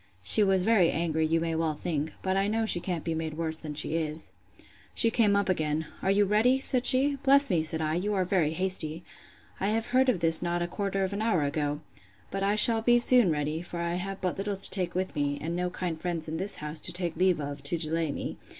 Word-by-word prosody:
She 215 - +4
was 190 -2 +2
very 195 -5 +3
angry, 160 0 -1
you 165 +1 0
may 165 0 -3
well 160 -1 -2
think. 155 -1 -4
But 190 0 -1
I 195 +1 0
know 225 +1 -1
she 175 - +2
can't 175 -2 -5
be 165 - -3
made 160 -1 -5
worse 160 -1 -1
than 150 -2 -8
she 155 - 0
is. 160 -1 -4 0.6
She 230 - +3
came 210 -4 +2
up 200 0 0
again. 160 -3 -2 0.2
Are 190 - -2
you 200 +1 +2
ready? 220 +6 +2
said 255 -2 +4
she. 275 +2 +5
Bless 275 -1 +3
me, 170 -3 +1
said 160 0 0
I, 155 0 -2
you 200 +5 -2
are 185 -1 -1
very 175 -5 0
hasty! 175 -3 0 0.6
I 195 - -2
have 220 +2 -1
heard 260 +1 +3
of 205 - 0
this 165 -1 +5
not 175 0 -2
a - - -3
quarter 195 +1 -3
of 190 +1 -3
an 200 - -4
hour 220 -9 0
ago. 145 0 -3 0.5
But 195 - -4
I 200 +1 0
shall 225 +1 +7
be 240 +1 +3
soon 240 -4 +5
ready; 150 +1 -3
for 175 0 -8
I 170 0 -3
have 195 +2 -5
but 185 0 -3
little 200 0 -3
to 195 - +6
take 180 -3 -3
with 185 +1 -3
me, 145 -1 -2
and 165 +2 -5
no 180 0 -2
kind 175 -3 -6
friends 170 -3 -4
in 160 +1 -5
this 195 +4 -1
house 150 +1 -7
to 175 - +2
take 175 -2 -4
leave 180 0 +1
of, 145 -1 -7
to 140 +5 +2
delay 160 -1 -1
me. - - -6
175 Hz, 250 wpm, -27 LUFS, 160-200 Hz, 0.6 s, shall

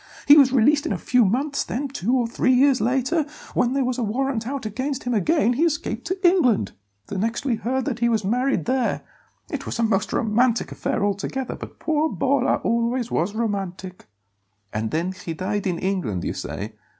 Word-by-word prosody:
He 290 - +9
was 275 -4 +6
released 285 +5 +3
in - - -2
a - - -2
few 250 -1 +3
months; 270 +8 0
then, 280 +4 -3
two 255 -2 -1
or 245 - +1
three 250 +2 +1
years 265 +1 +4
later, 265 +7 +1 0.3
when 245 +1 +1
there 270 -1 +1
was 255 0 -1
a - - 0
warrant 235 +1 -1
out 275 -2 -4
against 260 +6 -3
him 245 - -1
again, 245 - +2
he 280 +7 +1
escaped 300 -5 -1
to 375 +1 +1
England. 255 - +3 0.3
The 190 - -4
next 230 +6 -2
we 260 - +1
heard 250 +4 -2
was 265 - 0
that 245 -3 -3
he 235 0 +2
was 220 -4 0
married 250 +6 0
there. 255 -1 0 0.5
It - - -4
was - - -3
a 230 - +1
most 215 -2 +1
romantic 235 +2 +1
affair 205 - -1
altogether, 205 +6 -2
but - - -10
poor 315 0 0
Bolla 270 -2 +1
always 235 +1 0
was 190 +6 0
romantic." 195 -4 -4 0.7
"And 110 +1 -2
then 170 +7 -1
he 180 -3 -7
died 200 +3 -2
in 175 -2 -1
England, 170 - -2
you - - -2
say?" 105 +3 -6
240 Hz, 200 wpm, -23 LUFS, 205-270 Hz, 0.7 s, He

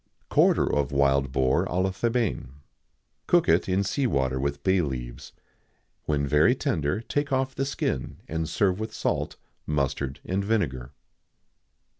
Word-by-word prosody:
[XIX - - -46
80] - - -39
Quarter - - +4
of 70 -1 0
Wild 70 -1 +2
Boar 65 -1 +2
à 90 +2 0
la 95 - 0
Thébaine. 115 +2 -1 0.8
Cook - - +4
it 85 +3 +3
in 95 +2 +2
sea 130 +7 0
water 65 - 0
with 70 +1 -2
bay 95 -1 +3
leaves. 65 -3 -5 0.7
When 70 -2 0
very 75 - +4
tender 100 - -1
take 145 +4 -2
off 130 0 0
the 135 - -1
skin, 75 - -3
and 80 0 -3
serve 95 -1 +1
with 110 0 -5
salt, - - -1 0.3
mustard, 70 -2 -1
and 95 +2 -1
vinegar. 75 - -1
80 Hz, 155 wpm, -26 LUFS, 70-105 Hz, 0.8 s, Quarter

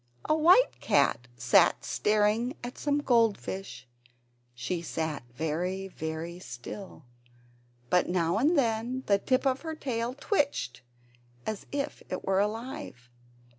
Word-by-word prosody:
A - - +3
white 350 +10 +5
cat 125 - +2
was 120 0 +6 0.2
staring 215 +5 +1
at 245 +1 -6
some 290 0 +1
goldfish; 205 - 0 0.7
she 165 +9 -3
sat 160 -3 -3
very, 175 +8 -2
very 160 +1 -5
still, 135 - -9 0.9
but 180 - +3
now 175 +2 +1
and 305 +7 +3
then 240 +1 0
the 200 -1 +3
tip 255 +6 +1
of 265 -1 +1
her 320 -1 -4
tail 245 -4 -2
twitched 285 - -1 0.6
as 215 -2 -4
if 285 +1 -3
it 185 - -4
were 190 0 +2
alive. 215 - -4
210 Hz, 125 wpm, -29 LUFS, 165-260 Hz, 0.9 s, was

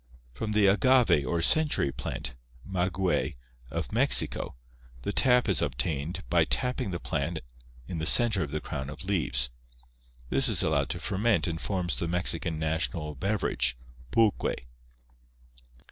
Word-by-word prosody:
From 105 - -4
the 105 -1 +3
agave 100 - +3
or 85 +2 0
"century 150 - +3
plant" 65 0 -6 0.3
(maguey) 95 -2 -1 0.3
of - - -4
Mexico - - +2 0.5
the 100 - -3
sap 125 -2 +4
is 95 -5 +3
obtained 70 +4 -3
by - - +3
tapping 125 -3 -1
the 85 -2 -4
plant 80 -1 -3 0.5
in 85 - -5
the 80 - 0
center 115 -5 +5
of 75 - -3
the 75 +2 -4
crown 65 +1 -5
of 75 - -9
leaves. 75 -11 0 0.8
This - - +6
is - - +4
allowed 70 -2 0
to 85 - -4
ferment 100 +5 0
and 80 -2 -3
forms 90 -4 -2
the 85 - -2
Mexican 85 -1 -1
national 80 0 -2
beverage, 75 - -1 0.3
"pulque." 110 - +1
85 Hz, 140 wpm, -28 LUFS, 75-100 Hz, 0.8 s, This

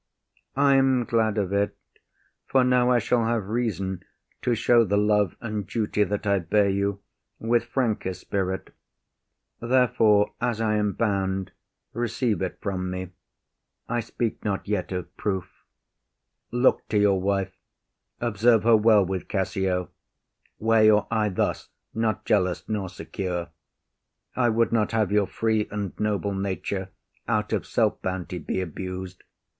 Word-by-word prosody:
IAGO. 140 - +3
I 140 -1 +5
am 130 -2 +3
glad 110 -2 +1
of 100 -2 -1
it, 100 0 0 0.7
for 130 -1 +3
now 125 -1 +3
I 125 - +4
shall 120 +1 +1
have 115 -4 -1
reason 100 -5 -2 0.4
To 120 -1 +1
show 120 +1 +4
the 100 -1 +1
love 105 -2 +2
and 105 -4 -4
duty 105 -2 0
that 105 0 -3
I 100 -1 +3
bear 100 +4 +2
you 100 0 -1 0.3
With 115 +1 +1
franker 110 -7 -1
spirit: 95 -1 -3 0.9
therefore, 115 -4 +3
as 120 -2 0
I 110 -1 +1
am 105 -1 0
bound, 95 -3 -1 0.4
Receive 115 -3 -1
it 95 - -3
from 95 -2 -2
me. 90 0 -5 0.8
I 120 0 -1
speak 115 0 -3
not 100 -2 -2
yet 95 -4 -2
of 90 -2 -5
proof. 95 -4 -2 1.0
Look 120 +2 +2
to 105 - 0
your 100 -2 +3
wife; 95 0 0 0.7
observe 115 0 +3
her 115 0 +6
well 105 -2 +5
with 95 0 -4
Cassio; 95 -2 -1 0.7
Wear 110 0 +3
your 105 -1 +5
eye 110 -2 +1
thus, 95 - -2 0.2
not 110 -2 -1
jealous 90 -4 +1
nor 100 -4 -2
secure. 90 -2 -4 0.9
I 120 -2 +3
would 115 +1 +2
not 110 -2 +1
have 110 -3 +1
your 105 -2 +3
free 110 -1 0
and 100 -3 -4
noble 105 -1 0
nature, 95 0 -3 0.4
Out - - 0
of - - -1
self - - +1
bounty, 90 -1 -4
be 95 +4 -2
abus’d. 95 +2 -7
105 Hz, 145 wpm, -25 LUFS, 95-115 Hz, 1.0 s, her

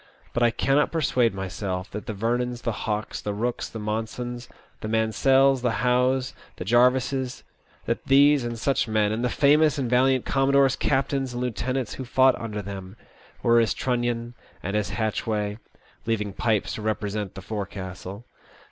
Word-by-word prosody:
But 120 - -1
I 120 - +5
cannot 135 +5 +1
persuade 125 - +1
myself 95 0 -4
that 105 - -6
the 110 - -3
Vernons, 120 +3 -1
the 120 - 0
Hawkes, 105 0 -3
the 105 - -3
Bookes, 120 +4 -2
the - - -6
Monsons, 115 +3 -4 0.3
the - - -5
Mansells, 130 +5 +3
the 120 -1 -1
Howes, 125 +1 +2 0.2
the 90 - -6
Jarvises— 125 +3 +2 0.4
'that - - -2
these 140 0 +5
and 120 0 -4
such 135 +2 +1
men, 110 -1 +1
and 110 +3 -2
the 125 - +1
famous 150 +2 +4
and 135 -3 -1
valiant 130 0 +3
commodores, 135 -1 +3
captains, 135 -1 0
and 120 - -3
lieutenants 125 +1 -2
who 130 - -6
fought 130 +1 +4
under 105 -2 -4
them, 95 0 -7 0.5
were 120 0 +5
as 115 -2 +2
Trunnion 120 -1 -1 0.3
and 100 +3 -2
as 105 -1 0
Hatchway, 110 -1 -2 0.5
leaving 105 -3 -1
Pipes 105 -5 0
to - - -5
represent 105 -2 -2
the 95 - -7
forecastle. 95 0 -6
120 Hz, 160 wpm, -25 LUFS, 105-130 Hz, 0.5 s, I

